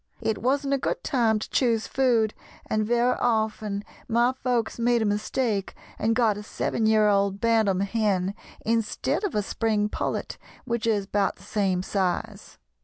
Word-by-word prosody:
It 220 -2 -1
wasn't 275 +3 +1
a 275 - +1
good - - -2
time 235 -6 +2
to 215 - -5
choose 230 -4 +2
food, 235 -5 +2 0.3
and 215 0 0
very 240 +3 +2
often 215 -3 0 0.2
my 235 +2 +3
folks 240 -2 0
made 235 -1 +2
a - - 0
mistake 210 0 -1 0.2
and 225 +1 +1
got 220 -4 +2
a - - -6
seven 220 +1 -1
year 215 -1 +4
old 200 -1 +2
bantam 220 -4 +2
hen 200 -2 0 0.3
instead 225 - 0
of 405 - -2
a 210 - +1
spring 210 0 0
pullet, - - -3 0.3
which 235 -2 -1
is 210 -3 +1
about 200 0 0
the - - -18
same 190 -3 0
size. 185 -3 -2
220 Hz, 165 wpm, -26 LUFS, 205-235 Hz, 0.3 s, year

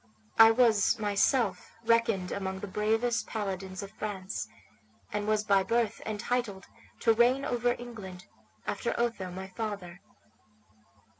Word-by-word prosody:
I 225 0 +11
was 225 -1 +4
myself 215 +4 +1
reckoned 230 -5 +2
among 190 -1 -3
the 205 - -5
bravest 225 +4 0
paladins 195 -2 -4
of 195 - -8
France, 200 -3 -4 0.7
and 210 0 -2
was 215 -1 +2
by 200 -2 +4
birth 230 +1 0
entitled 215 -1 -2 0.4
to 225 - +5
reign 245 +4 +3
over 245 0 +1
England, 210 -7 -9 0.4
after - - -2
Otho, 230 -6 -1
my 190 +1 -7
father. 190 -3 -5
215 Hz, 125 wpm, -30 LUFS, 195-230 Hz, 0.7 s, I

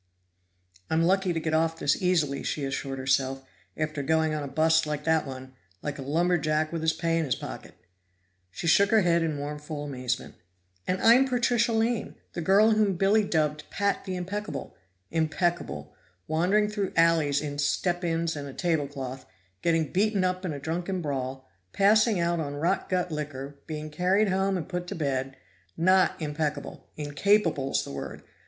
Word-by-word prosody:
"I'm 160 +1 +2
lucky 190 +1 +2
to 165 - -1
get 160 0 -2
off 165 +1 +2
this 145 -3 +1
easily," 160 -7 +1
she 145 - -2
assured 135 0 -3
herself, 135 0 0 0.3
"after 155 -1 -2
going 160 +2 +1
on 155 - -2
a 145 - -4
bust 160 +2 +3
like 150 -1 -3
that 160 -2 +2
one, 130 0 -8 0.3
like 150 -1 -4
a - - -4
lumberjack 155 +1 +1
with 165 - -2
his 160 0 +3
pay 165 0 0
in 160 - 0
his 130 - 0
pocket." - - -8 0.7
She 95 - -7
shook 200 +5 +5
her 220 -1 +5
head 170 -2 +3
in 160 -2 0
mournful 150 +1 -5
amazement. 125 -3 -3 0.5
"And 185 0 0
I'm 245 +4 +6
Patricia 240 -2 +2
Lane, 225 0 0 0.2
the 175 - -3
girl 200 +6 +5
whom 215 -3 +2
Billy 200 +4 +3
dubbed 150 -5 0
'Pat 200 0 -1
the 190 -2 -3
Impeccable'! 200 +4 -5 0.4
Impeccable! 160 - -1 0.3
Wandering 180 +7 +2
through 205 -2 -3
alleys 160 -4 +3
in 145 -1 -5
step 175 +4 0
ins 165 -1 0
and 145 -1 -5
a 135 - -9
table 160 -5 0
cloth 135 -2 -7 0.3
getting 165 -4 +1
beaten 200 0 +2
up 185 0 -1
in 180 - -2
a 145 - -4
drunken 175 +5 -3
brawl 130 -2 -4 0.3
passing 215 +1 +4
out 170 0 +1
on 145 -2 -3
rot 170 +6 0
gut 180 -1 0
liquor 145 -2 -5
being 155 -1 -5
carried 190 +6 +2
home 190 0 +1
and 170 - -5
put 180 -1 -4
to - - -5
bed! 135 -3 -2 0.4
Not 185 +2 +3
impeccable; 150 -2 -3
incapable's 150 -1 +1
the - - -8
word! 70 - -7
160 Hz, 175 wpm, -27 LUFS, 145-185 Hz, 0.7 s, I'm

